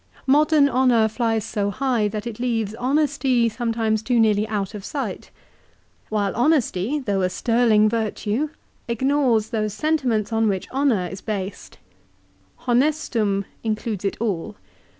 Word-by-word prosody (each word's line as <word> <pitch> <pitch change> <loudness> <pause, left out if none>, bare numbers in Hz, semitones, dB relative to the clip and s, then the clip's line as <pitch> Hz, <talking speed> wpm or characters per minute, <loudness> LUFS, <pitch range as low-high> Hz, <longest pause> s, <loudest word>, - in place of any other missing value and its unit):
Modern 295 +1 +4
honour 250 -4 +3
flies 225 -1 -1
so 205 -2 -1
high 240 -1 0
that 210 0 -5
it 235 -2 -6
leaves 225 -4 -1
honesty 265 -1 +1
sometimes 225 -2 -1
too 240 +1 +1
nearly 215 -1 +3
out 205 -2 -3
of 205 -2 -7
sight. 280 +6 -5 0.8
While 205 -3 -1
honesty 245 - +1
though 205 -9 -1
a 185 - +1
sterling 225 0 +3
virtue, 225 +4 -1 0.4
ignores 245 -2 +1
those 215 -2 -1
sentiments 250 -8 0
on 225 0 +2
which 190 -3 -1
honour 260 -9 +1
is 190 - -8
based. 200 -3 -5 0.9
"Honestum" 240 -6 +1 0.2
includes 215 -2 -2
it 195 - -1
all. 210 -4 -2
225 Hz, 130 wpm, -22 LUFS, 210-255 Hz, 0.9 s, Modern